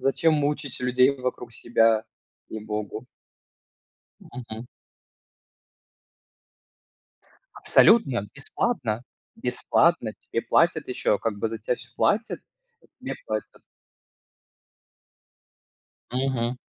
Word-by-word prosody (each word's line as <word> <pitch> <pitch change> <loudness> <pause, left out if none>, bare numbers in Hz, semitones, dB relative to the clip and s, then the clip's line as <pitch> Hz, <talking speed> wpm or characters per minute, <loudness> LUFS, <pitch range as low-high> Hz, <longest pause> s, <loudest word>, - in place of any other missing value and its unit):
Зачем 155 +4 +3
мучить 145 -2 -1
людей 125 +1 +4
вокруг 125 -3 -4
себя? 115 -1 +2 0.4
Ей-Богу. 105 -2 -5 1.1
Мгм. 120 -1 -9 2.9
Абсолютно 135 - +4
бесплатно 135 - -2 0.3
бесплатно. 125 0 +1
Тебе 115 - -3
платят, 165 -3 +2
еще, 125 -4 +1
как 110 -3 -2
бы 110 - 0
за 115 0 -5
тя 115 +3 -1
всё 125 - -13
платят, 225 +3 +1 0.4
и - - -23
тебе - - -4
платят. - - -4 2.5
Мгм. 125 -2 -1
125 Hz, 85 wpm, -25 LUFS, 115-140 Hz, 2.9 s, людей